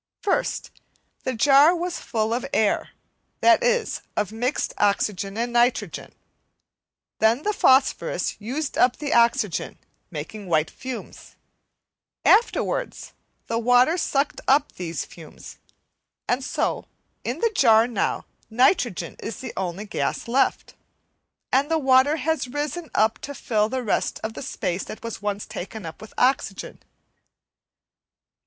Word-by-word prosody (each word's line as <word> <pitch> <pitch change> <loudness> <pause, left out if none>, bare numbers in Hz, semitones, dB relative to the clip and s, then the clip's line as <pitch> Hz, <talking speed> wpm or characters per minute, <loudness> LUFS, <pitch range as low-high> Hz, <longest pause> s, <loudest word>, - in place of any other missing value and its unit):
First, 400 - -1 0.5
the 260 - -1
jar 285 +7 +6
was 350 0 -3
full 220 0 -1
of 245 +2 -1
air, 215 -2 +1 0.5
that 350 +6 +6
is, 485 -1 +1 0.2
of 210 -1 0
mixed 245 +5 -2
oxygen 200 -1 0
and 240 +1 -2
nitrogen; 240 +1 +1 1.1
then 225 +6 +3
the 420 - 0
phosphorus 265 -8 +2
used 270 +7 -3
up 250 0 +4
the 290 -2 -2
oxygen 235 -6 +2 0.3
making 180 +6 -7
white 155 -2 +1
fumes; 255 -1 -8 0.9
afterwards, 475 +2 +2 0.3
the 230 - -1
water 245 +6 +4
sucked 290 -4 -1
up 280 +2 +3
these 170 -4 -5
fumes; 160 -3 -13 0.7
and 250 +2 0
so, - - -2 0.4
in - - -3
the 460 -1 +1
jar 225 - +5
now 235 -5 -2 0.2
nitrogen 240 - +1
is 225 - -6
the 260 - -7
only 190 +2 -3
gas 205 - -3
left, 260 +3 +1 0.8
and 275 +3 +2
the 325 - +2
water 265 0 +4
has 320 -2 -1
risen 295 +5 -4
up 220 +1 +2
to 285 -1 -7
fill 220 -4 -1
all - - -4
the 260 +1 -2
rest 215 - -1
of 220 0 -3
the - - -7
space 180 +1 -3
that - - -9
was 230 -2 -6
once 205 0 -3
taken 205 +1 -7
up 160 - -8
with 220 - -11
oxygen. 250 -6 0
240 Hz, 135 wpm, -24 LUFS, 215-280 Hz, 1.1 s, jar